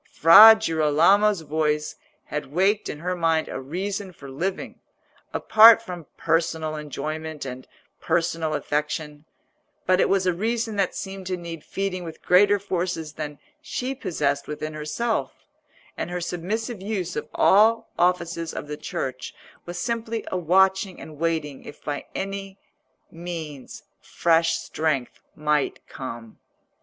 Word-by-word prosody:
Fra 210 +8 +9
Girolamo's 170 +3 +3
voice 150 0 -1 0.3
had 150 0 -4
waked 195 +6 +1
in 150 - -6
her 180 +1 -2
mind 165 -2 +1
a 135 - -5
reason 190 +7 -4
for 140 -6 -12
living, 185 +8 -4 0.5
apart 225 +1 +7
from 180 -8 -9
personal 165 -1 0
enjoyment 155 +1 -5
and 130 0 -7 0.3
personal 165 -2 0
affection; 150 0 -3 0.6
but 185 +1 +3
it - - +2
was 195 -1 +2
a 180 - +2
reason 225 +4 -2
that 195 -2 0
seemed 195 -1 -6
to 185 -1 -2
need 170 -3 -8
feeding 195 -2 -3
with 165 -2 -9
greater 200 +3 +5
forces 175 -5 -3
than 150 -2 -6 0.2
she 265 -3 -3
possessed 145 - -2
within 155 +1 -5
herself, 155 +10 -3 0.5
and - - -4
her 180 0 -3
submissive 200 +6 -3
use 190 -4 -3
of 150 0 -4
all 220 +3 +4
offices 170 -2 0
of - - -5
the 150 0 -5
Church 130 -3 -5 0.3
was 175 0 -6
simply 230 -2 -3
a - - -1
watching 190 +2 +2
and 155 -2 -11
waiting 160 -4 -2
if 145 - -12
by 145 -1 -4
any 195 0 -5 0.5
means 165 -5 -7 0.2
fresh 165 0 +2
strength 155 -5 -2 0.2
might 150 -2 0
come. 115 -4 -8
170 Hz, 135 wpm, -24 LUFS, 150-195 Hz, 0.6 s, Fra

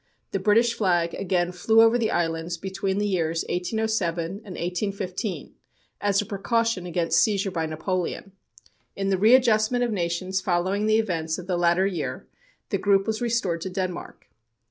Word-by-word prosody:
The 195 - -1
British 225 +4 +3
flag 175 -6 +1
again 180 -2 0
flew 220 +5 +4
over 225 +1 +5
the 230 -3 +1
islands 165 0 -1
between 190 +2 -3
the 205 - 0
years 165 -4 0
1807 180 -2 -1
and 195 +5 -7 0.2
1815, 190 +2 -3 0.5
as 200 -1 +2
a 210 - -1
precaution 220 -1 -1
against 170 -1 +2
seizure 200 -2 +1
by 165 -3 -2
Napoleon. 180 +4 -3 0.6
In 195 0 -1
the 190 -1 +1
readjustment 230 +1 +4
of 240 - 0
nations 185 0 -1
following 185 +4 0
the 215 0 +4
events 165 -7 -1
of 180 - -8
the 185 -1 -1
latter 175 +2 +3
year, 195 -3 -3 0.4
the - - -1
group 195 -1 +3
was 220 0 -2
restored 225 -8 0
to 190 - -4
Denmark. 185 -1 -5
190 Hz, 160 wpm, -25 LUFS, 175-215 Hz, 0.6 s, over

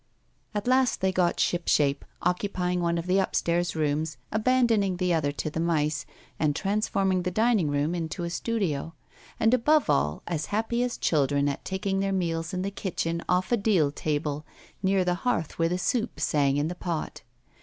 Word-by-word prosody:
At 205 - -2
last 255 -1 +3
they 190 0 +1
got 180 -2 +1
shipshape, 150 -5 +2 0.2
occupying 180 0 0
one 170 0 +1
of 170 - -3
the 185 +2 +2
upstairs 175 -2 0
rooms, 155 -1 -1
abandoning 220 -4 +2
the 180 -1 +1
other 150 -3 +1
to 155 - -3
the 160 - -3
mice, 155 -3 0 0.3
and 150 -2 +1
transforming 195 -1 0
the 180 - -1
dining 215 -4 +2
room 145 +3 0
into 170 0 -3
a 170 - -3
studio; 165 -6 -2 0.4
and, 225 +1 +3
above 295 +5 +3
all, 75 +2 0
as 160 -3 -2
happy 225 +3 0
as 250 -1 -1
children 145 -2 +2
at 140 - -3
taking 195 0 -2
their 195 0 0
meals 165 -3 -1
in 185 0 -2
the 200 - -2
kitchen 170 -4 -2
off 180 +3 +1
a 240 - +4
deal 190 -9 +2
table, 150 0 -2 0.4
near 190 -1 +2
the 180 - +2
hearth 205 - -1
where 165 0 +3
the 180 - 0
soup 230 +5 -1
sang 140 -2 +2
in 145 +1 +1
the 175 - -3
pot. 175 -3 -4
180 Hz, 180 wpm, -27 LUFS, 155-200 Hz, 0.4 s, a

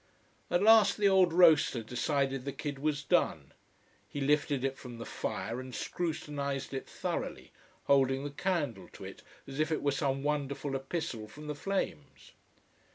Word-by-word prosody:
At 175 - +2
last 220 -2 +7
the 205 -1 +4
old 190 -3 +5
roaster 160 -8 +5
decided 135 +3 -1
the 140 - -3
kid 145 -1 -5
was 150 0 -1
done. 135 - +1 0.6
He 145 - -5
lifted 145 -1 +1
it 135 0 0
from 125 -3 -10
the 115 - -7
fire 115 +3 -4
and 130 -1 -7
scrutinised 145 -5 -3
it 135 - -5
thoroughly, - - -4 0.3
holding 135 -1 +3
the 145 - -4
candle 145 - -2
to - - -10
it, - - -9 0.2
as 135 +1 -7
if 155 +1 +1
it 155 - -1
were 145 - +3
some 135 -1 -1
wonderful 145 -1 -1
epistle 135 -5 -4
from 150 +7 -11
the 150 - -3
flames. 145 - -4
140 Hz, 160 wpm, -31 LUFS, 135-155 Hz, 0.6 s, last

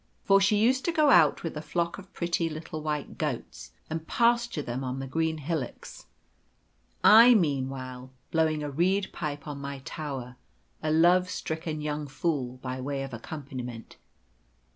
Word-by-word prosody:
For 195 0 +5
she 195 +2 +4
used 255 +5 +3
to 340 - +2
go 305 -3 +4
out 160 - +5
with 165 - -4
a 150 - -4
flock 170 +3 -2
of 195 0 -14
pretty 170 -2 -1
little 155 0 -6
white 150 -2 -4
goats, 60 - -4 0.2
and 160 0 -5
pasture 235 -8 +2
them 125 +2 -4
on 130 0 -3
the 135 - -4
green 160 +4 -1
hillocks, 155 -3 -5 1.0
I 235 +3 +9
meanwhile 130 - -1 0.2
blowing 160 -2 +1
a 145 - -4
reed 190 +6 +1
pipe 145 -3 -5
on 145 -1 -5
my 140 0 -5
tower, 135 -5 -6 0.4
a 155 - -1
love 175 +3 +4
stricken 160 -3 -4
young 150 0 -3
fool, 135 -3 -2
by 130 0 -4
way 135 +1 -3
of 135 -2 -7
accompaniment. 125 -2 -7
155 Hz, 160 wpm, -28 LUFS, 135-175 Hz, 1.0 s, I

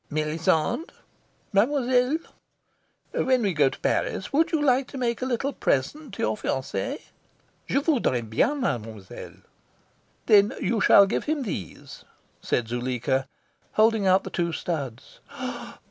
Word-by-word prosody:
"Melisande!" 160 - 0 0.6
"Mademoiselle?" 250 +5 +3 1.0
"When 255 -2 +2
we 195 -3 +1
go 145 -3 +4
to - - -10
Paris, 190 - -1
would 320 +3 +3
you 320 - +2
like 265 -2 +2
to 275 - -9
make 235 -2 -1
a 255 - -1
little 265 +3 -1
present 240 - -1
to - - -3
your 110 - +1
fiance?" 260 - -3 0.7
"Je - - 0
voudrais 240 - +1
bien, 285 - +1
mademoiselle." 110 - -5 0.9
"Then 210 +2 +5
you 225 -3 0
shall 200 - +7
give 195 - -2
him 300 -2 -1
these," 130 - -7 0.4
said 120 - -1
Zuleika, 130 +2 -1 0.5
holding 215 -2 +3
out 185 +1 +4
the - - -7
two 170 -1 -1
studs. 140 -9 -5
200 Hz, 130 wpm, -25 LUFS, -, 1.0 s, shall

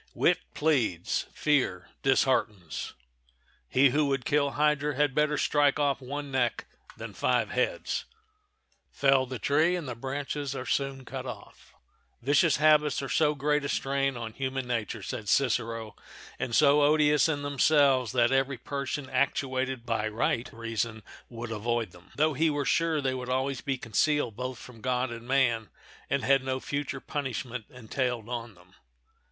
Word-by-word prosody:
Wit - - +3 0.2
pleads; 125 - 0
fear 130 - 0
disheartens. 110 - 0 0.8
He 135 0 +5
who 150 +2 +2
would 135 -2 -1
kill 145 -1 +2
hydra 150 -1 +1
had 145 -1 +2
better 150 +1 +2
strike 145 -2 +3
off 140 -2 +1
one 140 +2 -5
neck 125 -3 0 0.3
than - - -7
five - - +1
heads,—fell 425 - -2
the 130 0 -5
tree 155 +9 +2
and 170 -5 -4
the 125 - -3
branches 140 +3 -4
are 130 - -5
soon 135 -1 -2
cut - - -6
off. - - -11 0.4
Vicious 140 +4 +3
habits 150 -2 +4
are 135 - -4
so 150 +4 +2
great 150 +1 +1
a 140 - -3
strain 135 -1 0
on 115 -2 -6
human 130 0 -3
nature, 115 -3 -3
said 105 +2 -5
Cicero, 115 -3 0 0.4
and 120 - -2
so 145 -1 +5
odious 150 0 +4
in 145 -2 -1
themselves 140 -4 +3
that 120 0 +3
every 135 0 +1
person 140 +2 -4
actuated 130 -1 -1
by 110 -2 0
right 120 +3 -1
reason 115 -1 -3 0.3
would 115 -1 -7
avoid 115 -1 -1
them, 90 +1 -17
though 155 +1 +2
he 160 +4 +2
were 145 -2 -1
sure 165 -2 +1
they 130 -1 0
would 125 -1 -5
always 130 +1 -1
be 135 -2 -2
concealed 125 +1 0
both 125 +1 -4
from 120 -3 -13
God 125 +1 0
and 115 0 -8
man 120 -4 +2 0.4
and - - 0
had 135 -1 +3
no 130 0 -2
future 140 -1 -4
punishment 125 -4 -4
entailed 125 -1 -3
on 120 -3 -5
them. 90 +1 -21
135 Hz, 155 wpm, -28 LUFS, 120-145 Hz, 0.8 s, He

